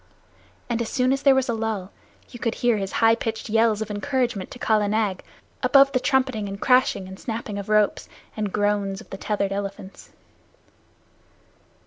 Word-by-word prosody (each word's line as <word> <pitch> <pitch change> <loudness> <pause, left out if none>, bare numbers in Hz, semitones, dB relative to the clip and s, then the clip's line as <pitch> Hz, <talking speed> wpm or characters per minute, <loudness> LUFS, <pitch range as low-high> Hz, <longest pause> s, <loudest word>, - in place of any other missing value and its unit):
And 235 -1 -1
as 230 - -3
soon 255 0 +2
as 275 - -2
there 275 -2 +5
was 265 -1 +1
a 235 - 0
lull 220 -4 -3 0.4
you 240 - -11
could 230 -1 -1
hear 240 -2 +2
his 195 -1 -4
high 225 0 +4
pitched 225 -1 -4
yells 220 -1 +2
of 215 - -8
encouragement 240 -2 -1
to - - -10
Kala 215 -3 +1
Nag, 205 -3 -1 0.4
above 275 0 +5
the 255 - +1
trumpeting 255 -6 0
and 195 0 -7
crashing, 250 -6 +2
and 190 0 -10
snapping 220 -3 -5
of 200 - -7
ropes, 210 -1 +2 0.3
and 210 -2 -2
groans 205 -1 0
of - - -15
the 195 - -5
tethered 200 -1 -1
elephants. 195 -1 -6
220 Hz, 175 wpm, -24 LUFS, 200-245 Hz, 0.4 s, there